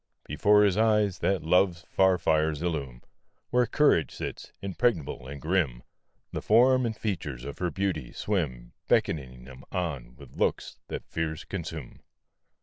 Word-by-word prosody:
Before 105 0 +4
his 100 -2 +3
eyes 105 -3 +3
that 95 -5 0
love's 90 +1 +2
far 95 -1 +4
fires 80 -2 +1
illume 70 -8 -3 0.5
Where 125 0 +3
courage 145 - +3
sits, - - -6
impregnable 95 - -1
and 70 +1 -7
grim 75 -7 0 0.5
The - - -4
form 125 +3 +4
and 110 - -4
features 75 - -4
of 70 - -7
her 90 - 0
beauty 85 -6 -2
swim, 70 - -3
Beckoning 65 -5 0
him 65 0 -12
on 70 -10 -3
with 70 -2 -15
looks - - -1
that - - -6
fears 80 0 -3
consume. 80 -6 -7
85 Hz, 145 wpm, -28 LUFS, 70-100 Hz, 0.5 s, Before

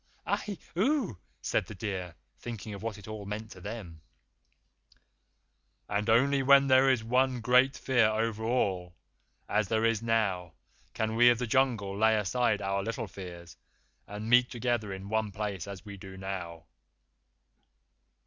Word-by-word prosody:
"Ahi! 205 -3 -2 0.2
Aoo!" 230 - +1 0.2
said - - 0
the 110 - -8
deer, 90 -4 -4 0.2
thinking 110 -3 -6
of 100 - -8
what 110 -2 -4
it 105 - -12
all 110 -1 -6
meant 105 +2 -6
to 90 - -11
them. 95 -6 -7 1.9
"And 105 +2 -1
only 135 +5 +4
when 140 +1 +6
there 130 0 +5
is 125 -4 +2
one 125 +2 +2
great 125 +3 +4
Fear 125 -4 +3
over 110 0 -1
all, 95 -7 0 0.5
as 105 0 +1
there 110 +3 +1
is 115 -2 +2
now, 100 -7 0 0.4
can 110 0 -1
we 120 +1 +7
of 120 - +4
the 125 - -2
Jungle 115 -5 +1
lay 110 +2 +4
aside 110 0 +1
our 100 0 0
little 115 +2 -3
fears, 85 -2 -10 0.5
and 105 +2 -6
meet 125 +1 +5
together 120 -4 -1
in 95 0 -7
one 110 0 -1
place 100 -3 -4
as 100 -1 -8
we 100 -1 -8
do 95 -1 -10
now." 90 -4 -6
110 Hz, 155 wpm, -30 LUFS, 100-120 Hz, 1.9 s, we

